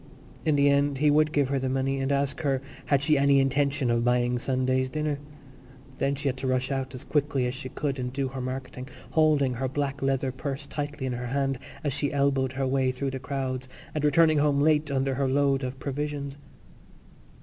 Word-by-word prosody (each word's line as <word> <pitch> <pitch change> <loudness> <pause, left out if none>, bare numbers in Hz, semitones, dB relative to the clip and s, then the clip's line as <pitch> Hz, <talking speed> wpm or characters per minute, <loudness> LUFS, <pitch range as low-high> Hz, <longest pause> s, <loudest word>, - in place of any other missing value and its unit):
In 155 -2 +3
the 140 0 +4
end 140 0 +3
he 150 +2 +4
would 155 +1 +3
give 145 -3 +1
her 140 -1 +1
the 130 0 -1
money 135 +1 0
and 135 +1 -1
ask 140 0 0
her 135 -3 +1 0.3
had 140 -1 +2
she 150 -1 +3
any 140 0 +5
intention 135 -1 +1
of 120 0 +1
buying 125 0 +2
Sunday's 130 0 0
dinner. 150 0 -2 0.8
Then 140 +1 +1
she 140 +1 -3
had 130 -1 0
to 130 0 -3
rush 130 +1 0
out 135 -1 -3
as 125 - -7
quickly 145 -3 0
as 125 - -1
she 130 0 -7
could 140 -1 -3
and 125 0 -3
do 135 0 -2
her 130 0 -5
marketing, 130 0 -5 0.2
holding 150 -5 +3
her 130 +2 -2
black 140 +1 -2
leather 135 -1 0
purse 140 +2 -5
tightly 145 -1 -4
in 130 - -1
her 120 0 -4
hand 135 0 -1 0.2
as 145 -3 0
she 140 0 0
elbowed 135 -2 +1
her 135 0 -1
way 130 0 +1
through 135 +1 -3
the 130 - -4
crowds 130 -1 -3 0.2
and 150 - -2
returning 155 0 +4
home 145 -1 +3
late 150 0 +3
under 135 -1 0
her 135 +1 0
load 140 0 +2
of 130 +1 -4
provisions. 140 +1 -4
135 Hz, 210 wpm, -27 LUFS, 130-145 Hz, 0.8 s, any